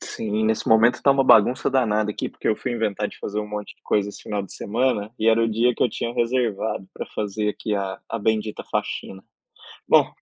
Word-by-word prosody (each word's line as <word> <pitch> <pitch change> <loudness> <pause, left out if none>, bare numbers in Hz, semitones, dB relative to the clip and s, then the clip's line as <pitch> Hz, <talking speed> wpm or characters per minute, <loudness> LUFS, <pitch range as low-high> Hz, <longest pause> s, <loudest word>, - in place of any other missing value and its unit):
Sim, 110 0 -3
nesse 110 0 0
momento 110 +2 +5
está 140 - +2
uma 135 -1 +3
bagunça 120 +1 +5
danada 110 -5 +1
aqui, - - -4
porque - - -9
eu 110 - +4
fui 125 - -4
inventar 105 -3 -1
de - - -14
fazer 105 +1 -3
um 105 - -6
monte 105 0 -6
de - - -40
coisa 105 -1 +1
esse 105 - -10
final 105 -1 -3
de 95 - -10
semana, 110 -1 -1
e 110 - +2
era 115 0 +4
o 115 - +1
dia 120 +2 +2
que - - -1
eu - - +4
tinha 120 0 -4
reservado 115 -5 -1
pra - - -5
fazer 105 0 -3
aqui 105 0 -2
a 95 -1 -3
a 115 - -3
bendita 110 0 -1
faxina, 95 - -3 0.7
bom, - - +5
110 Hz, 225 wpm, -23 LUFS, 105-115 Hz, 0.7 s, momento